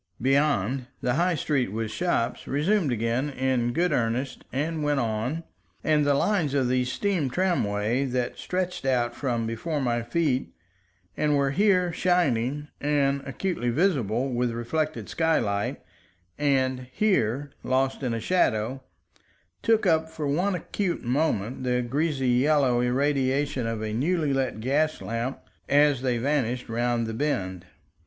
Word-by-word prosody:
Beyond, 135 -2 +1
the 125 - +1
High 175 +5 +2
Street 135 -7 0
with 110 0 -3
shops 125 -6 -1
resumed 155 +2 +1
again 120 +4 0
in 130 -3 0
good 175 +7 +1
earnest 125 +3 -1
and 155 +4 -2
went 145 -1 +1
on, 120 +7 -2 0.4
and 150 -1 +3
the 140 - +4
lines 160 -4 +1
of 130 -3 +2
the 125 0 +2
steam 165 +2 0
tramway 125 - 0
that 125 -2 -2
started 180 -3 -2
out 120 -2 +1
from 120 -4 -1
before 115 +8 -2
my 120 -3 0
feet, 130 +2 -1 0.6
and 150 -1 +2
were 140 -1 +2
here 180 0 +3
shining 150 -6 +1
and 140 -1 +1
acutely 135 -3 -2
visible 130 - +1
with 120 0 +1
reflected 150 +7 -2
skylight 105 -11 0 0.6
and 130 -3 0
here 145 - +1
lost 130 +1 0
in 125 -4 -1
a - - -2
shadow, 125 -4 +1 0.8
took 225 -1 +2
up 160 0 +2
for 160 -2 -5
one 180 +7 +1
acute 180 +1 -2
moment 125 -3 0
the 125 -1 +1
greasy 140 +1 0
yellow 130 0 +3
irradiation 135 0 +1
of 115 -1 -3
a 110 -1 -3
newly 150 +4 +1
lit 130 -5 -1
gaslamp 130 -2 -1 0.3
as 145 -2 +4
they 125 -2 0
vanished 125 -2 -1
round 120 0 0
the 110 - -4
bend. 95 - -2
135 Hz, 140 wpm, -26 LUFS, 120-155 Hz, 0.8 s, the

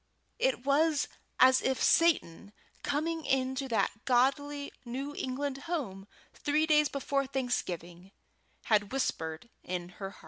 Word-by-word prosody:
It - - +1
was 295 +2 +3 0.3
as 260 0 +7
if 265 -1 0
Satan, 210 - +2 0.3
coming 320 +3 -1
into 265 0 0
that 225 -2 -1
godly 280 +3 +1
new 270 +4 -5
England 270 +1 -3
home 200 - -3 0.3
three 300 +1 +1
days 300 -2 +4
before 275 0 -1
Thanksgiving, 185 -9 -3 0.5
had 205 -2 +2
whispered 165 -6 -2
in 180 -1 -4
her 195 +2 -7
ear. 195 - -11
265 Hz, 125 wpm, -31 LUFS, 205-290 Hz, 0.5 s, as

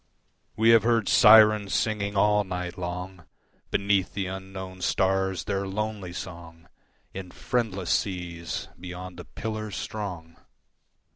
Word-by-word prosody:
We 110 +2 +3
have 115 -1 +7
heard 115 -1 +2
Syrens 105 -2 +7
singing 100 -2 -1
all 105 +1 +4
night 90 -2 -5
long 90 0 -6 0.4
Beneath 100 -1 +1
the 100 -1 -1
unknown 95 0 -7
stars 95 -1 +1
their 100 0 -2
lonely 105 -2 -3
song 85 -2 -9 0.5
In 95 -1 -7
friendless 100 -5 -2
seas 85 -3 -2
beyond 90 0 -8
the 90 - -8
Pillars 110 -2 -5
strong. 90 -6 -6
95 Hz, 120 wpm, -26 LUFS, 90-105 Hz, 0.5 s, have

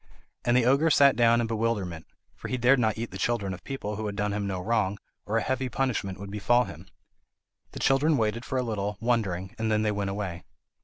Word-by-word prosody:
And 120 +1 +3
the 125 - +3
ogre 140 +6 +4
sat 140 -2 +6
down 120 0 +4
in - - 0
bewilderment, 110 -7 -2 0.3
for - - -8
he 130 - -2
dared 125 +2 +4
not 110 -3 +1
eat 115 +1 -4
the 95 - -7
children 100 -4 0
of 90 - -10
people 105 -7 -5
who 110 0 -3
had 100 - -4
done 105 0 -1
him 100 -1 -2
no 95 -2 -2
wrong, 105 0 0 0.3
or 110 - +1
a 115 - +1
heavy 130 0 -1
punishment 120 -8 -2
would 100 0 -7
befall 120 +4 +3
him. - - -10 0.9
The - - -6
children 145 +3 +3
waited 110 +1 0
for 130 - -3
a 130 - +1
little, 105 -3 -3
wondering, 100 -6 -1
and 110 0 0
then 105 0 +2
they 105 - +1
went 100 -1 -2
away. 95 -4 -4
110 Hz, 225 wpm, -27 LUFS, 100-120 Hz, 0.9 s, sat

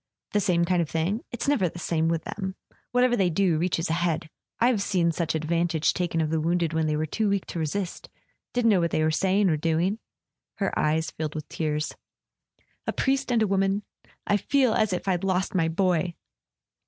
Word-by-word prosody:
"The 210 - +2
same 175 -3 +2
kind 180 0 +2
of 160 - -2
thing? 175 +8 -1
It's 240 +2 -4
never 255 -12 +2
the 175 - -11
same 165 -2 0
with 165 -1 0
them! 190 0 -5 0.4
Whatever 245 0 +3
they 190 -5 +2
do 175 -2 +2
reaches 170 0 0
ahead. 165 -2 -1 0.3
I've 235 -3 +3
seen 175 -4 +1
such 165 -1 -2
advantage 165 0 +1
taken 170 -2 -1
of 155 -1 -1
the 160 -1 +1
wounded 170 0 0
when 160 -1 +1
they 150 - +1
were 155 - 0
too 210 +7 0
weak 200 -1 0
to 170 - -5
resist... 175 +4 -3 0.4
didn't 240 -2 +3
know 195 - +4
what 170 -1 +1
they 155 - +1
were 155 - +2
saying 195 +4 +2
or 160 -3 +2
doing.. 165 +7 0 0.3
." - - -63
Her 195 - -1
eyes 160 +1 +1
filled 155 -1 -4
with 155 - -5
tears. 150 -1 -2 0.9
"A - - +2
priest 270 -1 0
and 230 -2 +3
a - - +1
woman—I 195 +1 -1
feel 255 +2 +2
as 215 -2 +2
if 180 +1 -3
I'd 180 -2 +1
lost 190 -1 0
my 170 -4 +2
boy!" 175 0 +1
175 Hz, 205 wpm, -26 LUFS, 160-200 Hz, 0.9 s, know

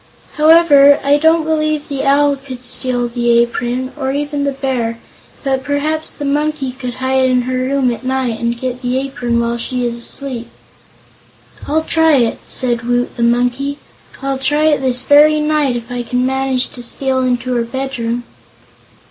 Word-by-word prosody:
"However, 300 -3 +6
I 285 +1 +3
don't 320 +1 +3
believe 310 -1 -1
the 275 -1 -3
Owl 285 +1 +3
could 260 -2 -10
steal 245 -1 0
the 235 0 +1
apron, 240 +2 -1
or 265 -3 -2
even 290 0 -2
the 280 - 0
Bear, 255 -4 -2 0.5
but 265 -2 -1
perhaps 300 +3 -1
the 290 - -6
Monkey 290 -1 -1
could 250 -1 -6
hide 260 0 +1
in 250 -1 +2
her 255 +1 -3
room 260 -1 +1
at 235 - -9
night 255 -3 -1
and 235 0 -2
get 255 0 -4
the 250 0 -1
apron 255 -3 -2
while 235 0 -1
she 250 +1 -2
is 235 -1 -2
asleep." 240 0 -3 1.2
"I'll 315 +2 +1
try 320 -1 +3
it!" 235 -4 +1
cried 240 -2 +1
Woot 245 +1 -1
the - - -5
Monkey. 245 +4 +1 0.5
"I'll 275 -1 -2
try 295 +3 +1
it 295 -3 +1
this 255 -1 +1
very 300 +1 +6
night, 300 -4 +1
if 240 0 -6
I 245 0 -3
can 250 +1 -1
manage 265 -1 0
to 245 - -9
steal 260 +2 -1
into 255 0 -1
her 240 -1 +1
bedroom." 245 -1 -3
260 Hz, 175 wpm, -16 LUFS, 245-285 Hz, 1.2 s, However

